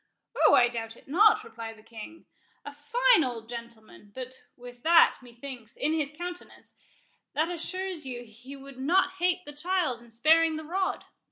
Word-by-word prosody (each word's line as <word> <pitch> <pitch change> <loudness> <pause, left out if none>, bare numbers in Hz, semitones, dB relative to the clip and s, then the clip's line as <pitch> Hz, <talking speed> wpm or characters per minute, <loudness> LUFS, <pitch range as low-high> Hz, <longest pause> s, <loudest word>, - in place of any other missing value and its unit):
"Oh, - - +7
I 240 - +6
doubt 230 -1 -6
it - - -20
not," 425 +8 +5
replied 225 - -8
the 215 - -18
king; 230 +9 -11 0.4
"a 285 - -7
fine 470 +8 +3
old 235 -3 -4
gentleman—but 235 +1 -9 0.2
with 245 0 -12
that, 335 +3 +6
methinks, 240 -1 -10
in 305 +2 0
his 300 -3 -1
countenance, 350 +3 -9 0.6
that 320 +3 +1
assures 365 0 -4
you 245 -2 -6
he 240 +5 -12
would 275 -1 -12
not 365 +7 +2
hate 360 +1 +1
the 295 - -9
child 305 -5 -1
in 240 - -17
sparing 315 +7 +4
the 315 - -5
rod. 375 +4 -2
285 Hz, 165 wpm, -28 LUFS, 240-345 Hz, 0.6 s, Oh